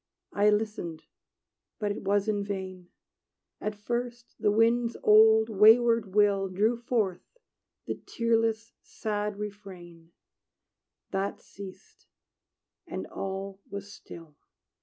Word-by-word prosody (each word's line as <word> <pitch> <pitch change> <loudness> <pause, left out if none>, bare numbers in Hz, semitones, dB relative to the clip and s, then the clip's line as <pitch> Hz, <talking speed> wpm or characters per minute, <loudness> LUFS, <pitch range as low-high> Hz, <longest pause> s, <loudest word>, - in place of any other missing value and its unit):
I 205 +1 +4
listened; 210 -6 -2 0.7
but 210 -2 -1
it 205 - -5
was 200 +1 +1
in 205 -2 0
vain. 190 -3 -6 0.7
At 210 0 -3
first, 240 +3 -4
the - - +2
wind's 230 +2 +2
old, 220 +1 +6
wayward 220 -1 +5
will 200 -2 +3
Drew 210 +6 +1
forth 230 - -2 0.5
the - - -2
tearless, 225 -1 0
sad 210 -2 -4
refrain: 185 -5 -9 1.0
That 195 +1 -2
ceased, 195 -2 -13 0.8
and - - -5
all 195 0 -6
was 200 0 -7
still. 165 -3 -12
210 Hz, 105 wpm, -28 LUFS, 195-225 Hz, 1.0 s, old